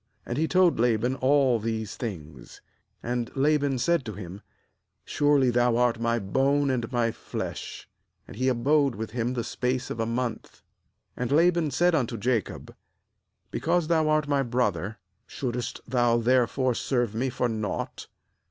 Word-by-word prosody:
And 120 - -4
he 160 +4 +1
told 180 -5 +3
Laban 120 +1 +2
all 130 -3 +3
these 110 -1 -3
things. 80 - -8 0.4
14And 120 -1 -2
Laban 145 -1 +2
said 170 +4 +1
to 110 - -5
him: 95 0 -8 0.6
'Surely 145 -3 +3
thou 120 -1 +2
art 120 -1 +2
my 115 0 +1
bone 135 +7 +1
and 120 -2 -2
my 120 -2 +1
flesh.' - - -6 0.4
And - - -11
he 130 - -1
abode 135 +2 +2
with 110 0 -5
him 120 +1 -1
the 120 - -1
space 125 +2 -2
of - - -5
a 115 - 0
month. 120 0 -4 0.6
15And 125 0 -2
Laban 170 +1 +3
said 175 +6 +2
unto 125 -6 0
Jacob: 115 -1 -2 0.4
* - - -49
Be - - -3
cause 170 -1 +1
thou 160 -2 +2
art 155 -1 +2
my 140 -1 +2
brother, 115 -5 -1 0.3
shouldest 125 -3 -4
thou 120 -1 +2
therefore 125 +1 +2
serve 120 -2 -1
me 125 +4 -1
for 125 0 -1
nought? 110 -3 -4
125 Hz, 160 wpm, -26 LUFS, 115-140 Hz, 0.6 s, told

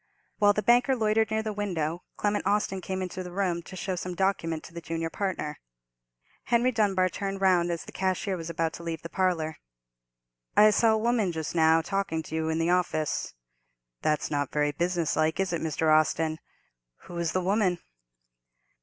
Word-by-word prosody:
While 205 -1 +5
the 210 - -1
banker 245 +3 +4
loitered 220 -1 +2
near 220 0 0
the 215 -1 -3
window, 175 -5 -2 0.2
Clement 205 -1 0
Austin 200 -2 0
came 190 0 -3
into 185 0 -5
the 180 -1 -7
room, 180 -2 -1
to 185 - -11
show 185 0 -3
some 180 0 -5
document 170 -4 0
to - - -12
the 170 - -6
junior 165 0 -3
partner. 185 -7 -3 0.9
Henry 240 +1 +3
Dunbar 200 -5 +2
turned 195 +2 -4
round 180 -3 +3
as 170 -1 -2
the - - -10
cashier 190 +1 -1
was 165 -2 -6
about 165 -1 -1
to 170 - -9
leave 165 -1 -4
the 165 - -6
parlour. 170 -5 0 1.0
"I 215 0 +8
saw 225 +1 +4
a - - +2
woman 220 -4 +1
just 160 -2 -4
now 160 -1 +4
talking 195 -4 -2
to 155 - -10
you 160 0 -1
in 160 - 0
the 165 +1 +1
office. 175 - 0 0.7
That's 150 0 0
not 145 -2 -1
very 150 0 +1
business 170 +1 0
like, 155 +2 +1
is 190 -2 0
it, 170 - -1
Mr. 155 0 +2
Austin? 155 0 +1 0.6
Who 175 - -7
is 170 -2 -1
the 185 - +1
woman?" 190 -1 +2
180 Hz, 190 wpm, -28 LUFS, 160-200 Hz, 1.0 s, I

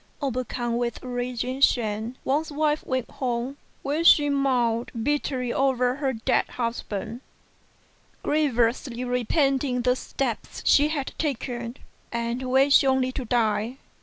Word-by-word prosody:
Overcome 250 -3 -2
with 240 0 -3
rage 245 -1 -3
and 260 +2 -2
shame, 220 0 +1
Wang's 300 +4 0
wife 300 +1 0
went 260 -2 -1
home, 250 +1 -3 0.3
where 295 +4 0
she 295 -3 +7
mourned 250 -4 +1
bitterly 260 -3 -1
over 255 -1 +1
her 275 -2 0
dead 225 -3 0
husband, 230 -1 -4 1.0
grievously 250 -4 +1
repenting 250 +1 +1
the 250 0 +3
steps 255 -2 -4
she 290 +1 +5
had 295 -3 -3
taken, 245 -4 -3 0.3
and 235 +1 -2
wishing 270 +1 +5
only 260 -1 +2
to 255 -1 -5
die. 225 +1 0
255 Hz, 125 wpm, -25 LUFS, 235-275 Hz, 1.0 s, she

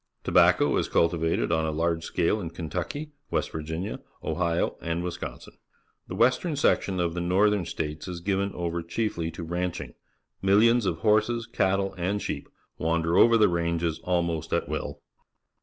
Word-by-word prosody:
Tobacco - - +4
is - - -1
cultivated 85 0 +1
on 80 -1 +1
a - - 0
large 80 +1 0
scale 95 +6 0
in 85 - -4
Kentucky, 90 - -5 0.2
West - - -1
Virginia, 80 +6 -4 0.2
Ohio, 85 +1 0
and 85 +1 -2
Wisconsin. 90 -1 -6 0.5
The 90 - -6
western 130 - +2
section 100 -9 +1
of 85 -1 0
the 85 - -3
North 95 +4 +3
ern 100 -4 -1
States 75 +1 -4
is 90 -1 -5
given 100 +2 0
over 85 0 -2
chiefly 85 -1 -2
to 85 - -7
ranching. 85 -5 -3 0.5
INlillions 110 +3 +4
of 85 -2 -2
horseSj_catUe,^Jid_sheep 100 -3 0 0.3
wander 85 +1 +1
over 115 0 +6
the 110 - +5
ranges 85 -1 -1
almost 85 -3 -1
at - - 0
will. - - -4
85 Hz, 145 wpm, -27 LUFS, 85-100 Hz, 0.5 s, over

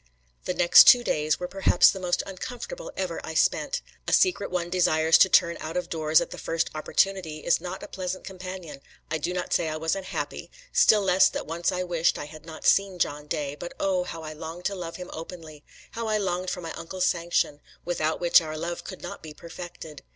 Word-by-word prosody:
The 180 - -2
next 175 0 +8
two 245 -1 +8
days 155 -7 0
were 180 - -3
perhaps 190 -1 +4
the 190 - -7
most 180 -1 0
uncomfortable 245 - -7
ever - - -3
I - - -6
spent. - - +1 0.2
A - - 0
secret 360 - +3
one 175 -1 -2
desires 160 -3 +3
to 190 - +6
turn 170 -2 +4
out 160 +3 -5
of 180 - -3
doors 155 -1 +3
at - - -4
the - - -7
first 165 0 -1
opportunity, 160 0 0
is 170 - +2
not 180 +1 -6
a - - -7
pleasant 185 0 -5
companion. 185 -6 -8 0.3
I 155 - 0
do 170 - -2
not 180 0 -3
say 160 - +1
I 155 - -3
was 160 +2 0
unhappy, 190 -1 -5 0.2
still 225 - +5
less 185 0 +5
that - - -5
once 170 +2 -1
I 180 0 -2
wished 175 -2 +1
I - - -5
had 155 +1 -13
not 160 -1 -9
seen 195 -2 +3
John 150 -3 -2
Day, 145 -3 -2
but 175 +4 -8
oh, 190 -2 +1
how 165 -2 -7
I 155 0 -6
longed 165 +3 -8
to 200 - 0
love 170 -3 -6
him 180 0 -8
openly! 160 -2 -9 0.3
how 230 0 -4
I 215 0 +1
longed 185 -2 -2
for 180 - -4
my 165 -1 -6
uncle's 185 +2 -3
sanction, 170 -4 0 0.2
without 160 -2 -1
which 175 0 +5
our 155 -1 -5
love 170 +2 -4
could - - -9
not - - -7
be 155 -1 -10
perfected! 170 -3 -10
175 Hz, 215 wpm, -26 LUFS, 160-185 Hz, 0.3 s, next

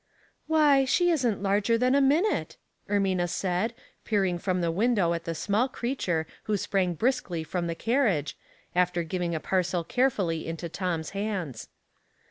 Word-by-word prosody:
" - - -38
Why, 300 -4 +5
she 350 +7 +3
isn't 240 - 0
larger 205 +3 +2
than 250 +2 +2
a 280 - +4
minute," 310 +10 +1 0.3
Er 205 - +2
mina 185 -3 +1
said, 185 +6 -1 0.3
peering 190 -5 0
from 185 0 -1
the 170 -1 0
window 200 -2 +2
at 170 -1 -4
the 165 - -3
small 215 +9 +1
creature 235 -11 -2 0.2
who 210 -1 +1
sprang 185 -2 0
briskly 220 - -1
from 170 +2 -3
the 165 - -2
carriage, 220 - +1 0.4
after 180 -1 +1
giving 170 0 -2
a - - -1
parcel 180 +1 0
carefully 190 -9 0
into 165 +1 -4
Tom's 175 -2 -3
hands. 195 - -4
195 Hz, 160 wpm, -27 LUFS, 170-240 Hz, 0.4 s, Why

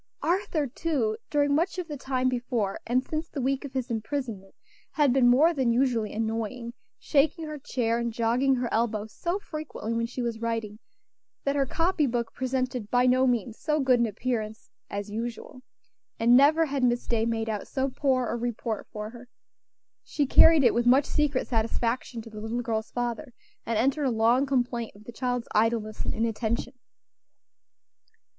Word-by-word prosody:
Arthur, 340 -4 0
too, 265 -5 -1
during 290 -1 +2
much 345 +5 +1
of 360 -2 -3
the 300 - -5
time 260 -2 -1
before 240 -5 -1
and 250 +2 +2
since 315 +1 -4
the 285 - -5
week 270 +2 0
of 280 -2 -8
his 260 -2 -3
imprisonment, 225 -4 -4 0.4
had 290 -5 +3
been 255 -2 +4
more 290 +8 +5
than 260 -6 +1
usually 235 -3 +1
annoying, 225 +2 -3 0.2
shaking 315 +3 +1
her 305 -1 -6
chair 235 -4 -1
and 235 0 -1
jogging 240 +4 +2
her 245 -1 -1
elbow 220 -2 0
so 340 - -3
frequently 305 - -5
when 230 0 0
she 250 +1 -4
was 230 -2 -3
writing, 225 -2 -3 0.6
that 280 0 0
her 275 -1 +1
copy 330 0 +1
book 235 -2 -2
presented 255 -4 -2
by 245 +2 +3
no 255 +1 +4
means 235 -2 -1
so 305 0 0
good 260 -3 +3
an 235 - +3
appearance 220 0 -4 0.2
as 205 0 -5
usual; 235 +3 -5 0.6
and 235 +2 +5
never 305 +5 +6
had 275 -3 -2
Miss 240 -1 +2
Day 230 -2 +1
made 225 -1 -1
out 210 -2 -3
so 265 0 -1
poor 260 -1 +1
a - - -2
report 235 -2 -3
for 210 0 -6
her. 245 +1 -12 0.8
She 290 - -1
carried 315 +2 +7
it - - +5
with 235 +1 +1
much 265 +3 +6
secret 290 -3 0
satisfaction 230 +1 -1
to 225 - -11
the 215 -1 -8
little 225 +2 -2
girl's 220 -2 -2
father, 245 +2 -4 0.3
and 230 -1 0
entered 275 +6 +1
a - - +3
long 235 +4 +3
complaint 245 -4 -1
of 205 - -15
the 240 - -9
child's 245 0 -2
idleness 215 0 +1
and - - -2
inattention. 230 +2 -1
245 Hz, 180 wpm, -27 LUFS, 225-275 Hz, 0.8 s, carried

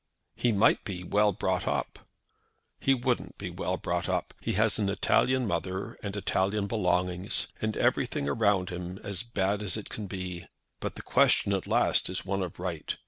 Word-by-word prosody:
"He 120 - +2
might 105 +1 +4
be 90 -3 -5
well 105 +3 +3
brought 95 -1 -1
up." - - -1 0.8
"He 135 - +3
wouldn't 125 -1 -1
be - - -5
well - - -2
brought - - -2
up. - - -1
He - - -1
has 110 +2 +2
an 100 -2 +1
Italian 125 +6 +2
mother 95 +3 -2
and 100 -2 -4
Italian 100 +1 0
belongings, 90 -3 0
and 110 -1 -1
everything 70 - +1
around 100 +2 +2
him 90 +1 -5
as 100 -3 -2
bad 100 -3 -1
as 100 -1 0
it 110 - -7
can 105 -2 -5
be. 90 -2 -5 0.3
But - - -4
the - - -8
question 100 - +4
at 95 - -1
last - - +3
is 90 - -3
one 100 0 -1
of 90 -3 -4
right. 85 -4 -3
100 Hz, 180 wpm, -29 LUFS, 90-105 Hz, 0.8 s, might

